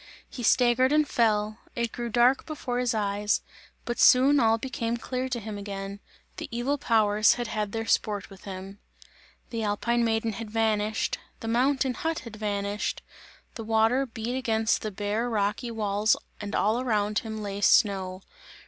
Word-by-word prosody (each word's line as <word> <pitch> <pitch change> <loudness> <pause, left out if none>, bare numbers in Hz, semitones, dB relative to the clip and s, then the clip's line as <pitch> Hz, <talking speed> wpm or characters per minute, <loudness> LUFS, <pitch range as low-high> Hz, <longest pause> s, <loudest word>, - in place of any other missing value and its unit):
He 250 - -8
staggered 250 +2 +4
and 305 0 +3
fell; 215 -3 +1 0.2
it 235 -1 -1
grew 240 -1 -4
dark 245 +4 +3
before 265 -6 -3
his 250 -1 0
eyes, 205 0 0 0.4
but 240 - -3
soon 270 +3 +6
all 225 -2 +4
became 235 -1 -3
clear 255 +2 -3
to 245 -2 -2
him 215 -1 -6
again; 200 0 -6 0.4
the - - -5
evil 260 +4 -1
powers 215 -3 +4
had 240 - -3
had 210 -2 -3
their 225 +1 -3
sport 205 -3 0
with 195 - -14
him. 195 +1 -8 0.7
The 230 -1 -2
alpine 225 +3 0
maiden 225 -1 0
had 225 +1 -6
vanished, 220 -1 0 0.2
the 225 - -5
mountain 260 +3 +2
hut 325 +4 -2
had 230 -3 -10
vanished, 205 -1 -2 0.5
the 225 - -7
water 225 +4 +2
beat 230 +1 -4
against 225 -3 +1
the 215 - -3
bare 210 +4 -2
rocky 215 +2 -1
walls 210 -1 +1 0.3
and 205 0 -4
all 220 +4 +2
around 210 -4 +1
him 220 -1 -6
lay 200 0 -4
snow. 190 -4 +3
225 Hz, 165 wpm, -27 LUFS, 210-240 Hz, 0.7 s, soon